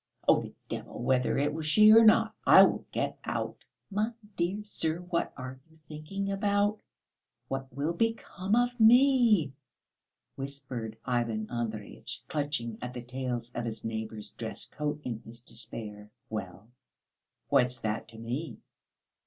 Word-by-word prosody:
Oh, - - +6
the - - -9
devil - - -6
whether 125 -1 +2
it 145 +2 +1
was 155 0 -3
she 215 +6 +8
or 225 +1 +9
not, 215 - +5
I - - +10
will - - +1
get - - -2
out." - - -3 0.3
"My 215 +4 0 0.2
dear 185 +5 -1
sir! 160 -6 0
What 175 -1 -2
are 130 0 -7
you 160 - -22
thinking 195 +6 -4
about? 205 +1 +1 0.7
What 135 0 -4
will 145 +6 -1
become 210 -1 0
of 245 +1 +1
me?" 230 - +6 0.8
whispered 130 -5 -5
Ivan 115 -4 0
Andreyitch, 110 -3 -5
clutching 140 -7 -2
at 125 0 -5
the 125 - -5
tails 125 -1 -4
of 120 -1 -4
his 110 -2 -5
neighbour's 110 -1 -4
dress - - -5
coat 150 0 -3
in 115 -3 -4
his 115 +1 -10
despair. 110 -3 -6 0.2
"Well, 105 +1 -6 0.8
what's 125 -1 +3
that 110 0 -2
to 115 -1 -13
me? 125 +8 -4
135 Hz, 145 wpm, -30 LUFS, 115-195 Hz, 0.8 s, I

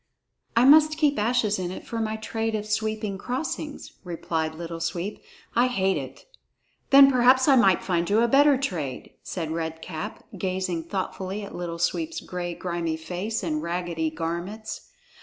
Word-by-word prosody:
"I 235 +2 +5
must 310 +2 +7
keep 295 -5 +2
ashes 215 -2 +1
in 180 -1 -2
it 185 - -7
for 230 - -4
my 220 -1 -1
trade 225 0 -2
of 210 -1 -3
sweeping 215 -2 -2
crossings," 280 +5 -4
replied 165 -3 -3
Little 165 0 -6
Sweep. 170 +5 -3 0.3
"I 240 +2 +4
hate 195 -6 +1
it." 135 -2 -7 0.6
"Then 275 0 +9
perhaps 255 +1 +5
I 275 - +7
might 195 -7 +4
find 175 -1 0
you 215 +3 +4
a 235 - +4
better 280 +2 +5
trade," 165 - -4
said 165 -4 -4
Red 160 0 -4
Cap, 160 -3 -6
gazing 185 -3 -2
thoughtfully 190 +2 -4
at 200 - -8
Little 170 -1 -4
Sweep's 325 - -1
gray 175 -1 -5
grimy 170 -3 -2
face 185 +7 -3
and 155 -3 -1
raggedy 170 -1 -2
garments. 170 +7 -5
190 Hz, 160 wpm, -25 LUFS, 170-230 Hz, 0.6 s, Then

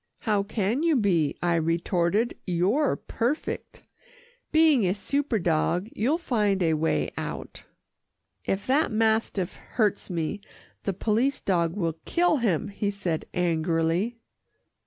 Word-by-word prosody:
"How 210 -3 +1
can 210 +5 -1
you 330 -2 +3
be," 180 - +2
I 175 -1 +2
retorted, 170 +6 +1
"you're 195 - +2
perfect 245 +7 -3 0.7
being 315 -6 +5
a 185 +1 +1
super 275 +4 -1
dog, 175 +2 0
you'll 265 +9 +1
find 210 - +1
a 165 -1 +3
way 155 +1 0
out." - - -6 0.8
"If 195 +1 -2
that 280 +3 +2
mastiff 220 -4 +1 0.2
hurts 215 -4 +1
me, 175 +3 -2 0.4
the 195 - 0
police 230 +8 +1
dog 170 -3 0
will 165 -5 -2
kill 350 -2 +2
him," 205 - 0
he 200 0 -2
said 185 -6 -3
angrily. 170 +5 0
200 Hz, 125 wpm, -26 LUFS, 170-235 Hz, 0.8 s, being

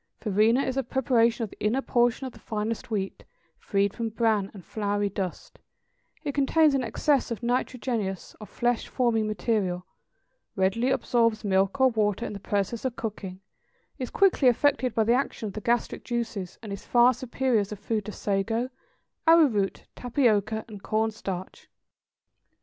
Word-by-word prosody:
Farina 215 +4 +3
is 260 0 -2
a - - +3
preparation 235 -2 +2
of 215 - -5
the - - -11
inner 240 +6 +1
portion 245 +1 +2
of 255 - -6
the - - -15
finest 220 +2 -3
wheat, 195 -4 -3 0.4
freed 200 -1 0
from 230 -1 -3
bran, 220 -3 +1
and 195 -4 -12
floury 205 -1 -1
dust; 190 -2 -5 0.6
it 290 - -1
contains 295 +2 +4
an 270 -2 +1
excess 270 +4 +1
of 230 0 -5
nitrogenous, 235 -5 -2
or 215 - -8
flesh 240 +3 -1
forming 230 -4 +1
material, 195 -3 -1 0.7
readily 195 +6 +1
absorbs 230 -4 +1
milk 195 +3 +1
or 265 0 +6
water 215 -1 0
in - - -5
the 200 - -6
process 205 +3 -2
of 260 -3 -2
cooking, 195 -4 -6 0.6
is 255 -2 -3
quickly 375 -9 +3
affected 255 0 +2
by 225 - +3
the 230 +2 +3
action 255 -3 -1
of 205 - -5
the 215 - -5
gastric 235 +2 0
juices; 225 -7 -3
and 210 -2 -5
is 200 - -7
far 245 +1 +5
superior 255 0 0
as 200 0 -3
a - - -3
food 210 +1 -2
to 215 - -5
sago, 225 +5 -1 0.6
arrowroot, 275 -13 +4
tapioca, 220 -4 +1
and 210 -3 -10
corn 220 +1 0
starch. 190 -4 -7
225 Hz, 165 wpm, -27 LUFS, 205-245 Hz, 0.7 s, or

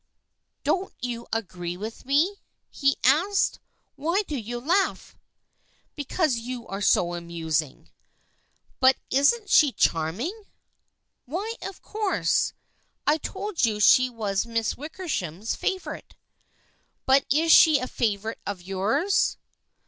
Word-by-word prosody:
" - - -54
Don't 380 +1 0
you 235 -1 -4
agree 175 -5 -4
with 220 +5 -7
me? 325 +9 +2
" - - -53
he 275 -1 +1
asked. 340 +10 +3 0.2
" - - -44
Why 335 +8 0
do 305 - -5
you 240 -1 -4
laugh? 360 +10 0 0.3
" - - -45
" - - -40
Because 290 -2 0
you 240 0 -6
are 195 +1 -6
so 175 -3 +3
amusing." 165 -4 -3 0.4
" - - -41
But 260 0 +6 0.2
isn't 290 - +2
she 295 -3 +6
charming? 240 - -1 0.2
" - - -49
" - - -54
Why, 375 - -3
of 390 -1 -8
course. 425 -2 0 0.5
I 300 +2 +3
told 410 +3 -4
you 215 -3 +2
she 255 +4 +6
was 215 -3 -2
Miss 230 -1 -1
Wickersham's 255 - -4
favorite." 380 -1 -4 0.5
" - - -41
But 265 0 +5
is 320 +4 +3
she 315 -2 +8
a 255 - -3
favorite 220 -3 -2
of 195 -3 -5
yours 210 - +1
255 Hz, 140 wpm, -25 LUFS, 205-325 Hz, 0.5 s, she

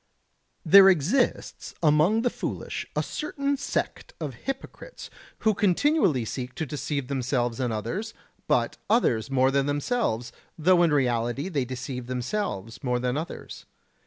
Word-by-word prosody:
There 195 +4 +9
exists 190 - 0
among 160 +9 +4
the 245 - +1
foolish - - -5
a - - +1
certain 280 -2 -2
sect 280 - -3
of 150 -5 -4
hypocrites 270 - -7 0.3
who 220 - +3
continually 195 - +2
seek 125 +2 -5
to 160 - -2
deceive 145 -1 -3
themselves 125 -3 -1
and 125 -3 0
others, 140 - -4 0.3
but - - +1
others 135 - +2
more 130 0 +3
than 140 0 +1
themselves, 145 - -1 0.3
though 175 +2 +4
in 170 -2 +4
reality 125 +2 0
they 140 -8 -1
deceive 125 0 -6
themselves 125 - -3
more 125 -2 +1
than 125 +1 -1
others. 160 +4 -6
145 Hz, 135 wpm, -26 LUFS, 125-195 Hz, 0.3 s, There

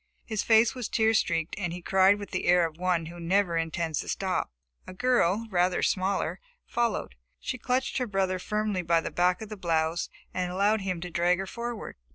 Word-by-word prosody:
His 215 -3 -2
face 225 0 +4
was 250 -4 -5
tear 220 0 +3
streaked, 165 -6 0
and 175 -4 -2
he 175 - -5
cried 190 +3 +4
with 205 -1 -8
the - - -2
air 175 -1 +5
of 160 -1 -6
one 180 -2 +1
who 170 +2 -9
never 180 +1 +1
intends 165 -1 -1
to - - -5
stop. 190 -2 -1 0.4
A 185 - -9
girl, 230 -3 +2
rather 180 0 +2
smaller, 190 +1 0 0.3
followed. 235 - -1 0.3
She 255 - -4
clutched 255 +2 0
her 250 - -1
brother 190 -2 0
firmly 210 -1 -1
by 170 -1 +2
the - - -5
back 180 +3 +1
of 215 - -9
the 215 - -7
blouse 165 -2 0 0.2
and 180 -1 -2
allowed 200 +3 +2
him 185 -3 -3
to 180 0 -6
drag 175 +2 +2
her 195 - -3
forward. 235 +2 -6
185 Hz, 205 wpm, -28 LUFS, 175-215 Hz, 0.4 s, air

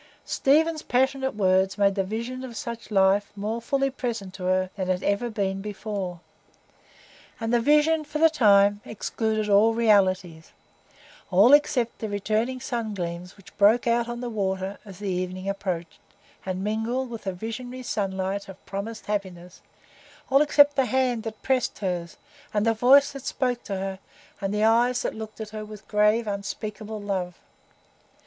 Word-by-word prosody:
Stephen's 310 +3 +2
passionate 265 +1 0
words 190 -1 +2
made 200 -1 +3
the 195 -1 0
vision 235 +6 -5
of 240 -3 -7
such 235 -1 -6
a - - -7
life 195 +1 +3
more 215 +3 -3
fully 275 +3 0
present 230 -8 -4
to 185 -2 -7
her 185 0 +1
than 185 -2 -3
it - - +4
had 180 - -5
ever 200 +4 0
been 195 -3 -2
before; 200 -3 -5 1.2
and 225 +1 -2
the 240 - +5
vision 300 +5 +3
for 300 +1 -5
the 325 +1 +6
time 205 -8 +4
excluded 220 0 -2
all 210 +2 +4
realities,—all 190 - +1
except 265 -5 +3
the 220 - -4
returning 220 +5 -1
sun 235 -4 -3
gleams 175 0 -5
which 195 - -17
broke 215 +4 +5
out 235 0 +1
on 240 0 -5
the 245 - -3
waters 190 -2 -2
as 195 -3 -11
the 205 +1 -6
evening 185 0 -3
approached, 185 -4 -4 0.5
and 185 0 -2
mingled 225 +5 -1
with 230 -3 -7
the 190 - -1
visionary 245 +6 -6
sunlight 195 -2 -2
of 195 0 -13
promised 210 +3 -6
happiness; 185 -4 -5 0.7
all 275 +2 +6
except 290 -1 +5
the 270 - +3
hand 250 -1 +1
that 220 -1 -8
pressed 260 -2 0
hers, 175 -4 -3 0.4
and 210 +1 +2
the 230 - +3
voice 265 +5 +5
that 275 -2 -9
spoke 250 -3 -1
to 200 - -5
her, 190 0 -4 0.4
and 195 0 -1
the 210 +1 0
eyes 240 +3 +3
that - - -2
looked 220 0 -8
at 220 -1 -5
her 215 -1 -6
with 215 -1 -11
grave, 210 +2 +3
unspeakable 210 +1 -5
love. 185 -3 -3
215 Hz, 170 wpm, -25 LUFS, 195-240 Hz, 1.2 s, the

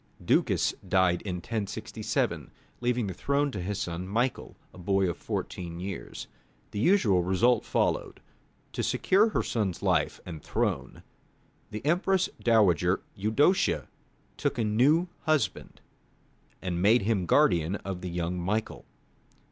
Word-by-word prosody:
Ducas - - +2
died 90 -2 +3
in 95 -3 -4
1067, 100 +3 -3 0.3
leaving 120 -1 0
the 95 - -4
throne 140 - 0
to 100 - -4
his 100 +3 -3
son, 90 -1 -4
Michael, 120 +6 -2 0.2
a - - -13
boy 95 +1 +1
of 85 - -2
fourteen 85 -1 -5
years. 95 -9 -6 0.5
The 100 - -4
usual 110 - +4
result 105 +7 +2
followed. - - -1 0.5
To - - -2
secure 205 +4 +3
her - - 0
son's 100 -6 -2
life - - +1
and 80 -4 -7
throne, - - -2 0.7
the 105 +5 -7
Empress 185 +4 +2
dowager 95 -6 +3
Eudocia 110 - +2 0.5
took - - -1
a 115 - +1
new 135 +11 +3 0.2
husband, 145 - -1 0.8
and 90 -2 -2
made 110 +4 +4
him 100 -4 0
guardian 85 +2 +3
of 95 -3 -6
the 90 - -4
young 90 +1 -2
Michael. 105 +5 -2
100 Hz, 130 wpm, -28 LUFS, 90-120 Hz, 0.8 s, usual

